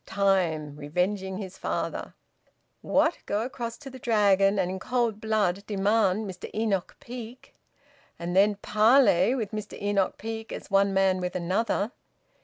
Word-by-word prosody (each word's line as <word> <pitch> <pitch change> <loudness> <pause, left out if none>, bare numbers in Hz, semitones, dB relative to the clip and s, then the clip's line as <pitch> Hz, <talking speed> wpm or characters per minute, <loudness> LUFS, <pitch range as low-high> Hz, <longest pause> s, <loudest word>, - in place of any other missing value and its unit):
Time, 175 -7 +1
revenging 185 +6 -2
his 190 -2 -8
father!... - - -3 0.7
What! 315 +4 +2
Go 205 +2 0
across 235 -2 -5
to 280 - -10
the 260 - -10
Dragon 200 -4 +3
and 185 -2 0
in 190 - -4
cold 230 -1 -1
blood 205 -3 0
demand 205 0 +2
Mr 185 -1 -7
Enoch 210 -5 -1
Peake, 240 0 -9 0.6
and 175 +1 -4
then 205 +2 +5
parley 215 0 +4
with 220 -6 -3
Mr 215 -1 -6
Enoch 200 -2 0
Peake 225 0 -6
as - - -8
one 195 0 +4
man 190 -1 +2
with 180 0 -3
another! 195 +4 0
200 Hz, 145 wpm, -27 LUFS, 190-225 Hz, 0.7 s, then